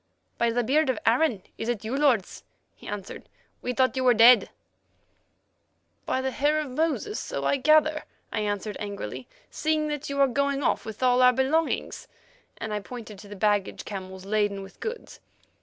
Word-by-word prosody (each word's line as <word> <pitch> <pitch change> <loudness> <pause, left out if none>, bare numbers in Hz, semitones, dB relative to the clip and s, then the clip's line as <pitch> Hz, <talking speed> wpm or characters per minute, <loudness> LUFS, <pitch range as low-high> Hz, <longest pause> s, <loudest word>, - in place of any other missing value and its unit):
"By 235 - +3
the 240 +1 0
beard 290 +5 +2
of 255 - +1
Aaron! 230 -4 +2 0.2
is 225 - -3
it 225 -3 -2
you, 235 +4 -2
lords?" 270 -9 +1 0.3
he - - -14
asked. 205 -2 -7 0.3
"We 250 - -2
thought 255 +1 +1
you 260 - 0
were 250 -2 +5
dead." 235 +3 +7 1.6
"By 260 - 0
the 265 0 -1
hair 295 +3 +1
of 300 -4 -4
Moses! 325 +9 -1
so - - -4
I 280 - +2
gather," 310 +2 +3 0.3
I - - 0
answered 205 0 -3
angrily, 130 - -6 0.2
"seeing 310 -1 0
that 295 -1 -4
you 280 0 -3
are 275 - +6
going 280 +2 0
off - - 0
with 220 +3 -6
all 250 0 +4
our 250 0 +7
belongings," 285 +6 0 0.5
and 220 -1 -5
I 210 - -1
pointed 215 -2 -9
to 205 - -12
the 205 - -9
baggage 205 -1 0
camels 190 -2 -7
laden 205 -1 0
with 195 - -14
goods. 455 +1 -6
250 Hz, 180 wpm, -26 LUFS, 210-280 Hz, 1.6 s, dead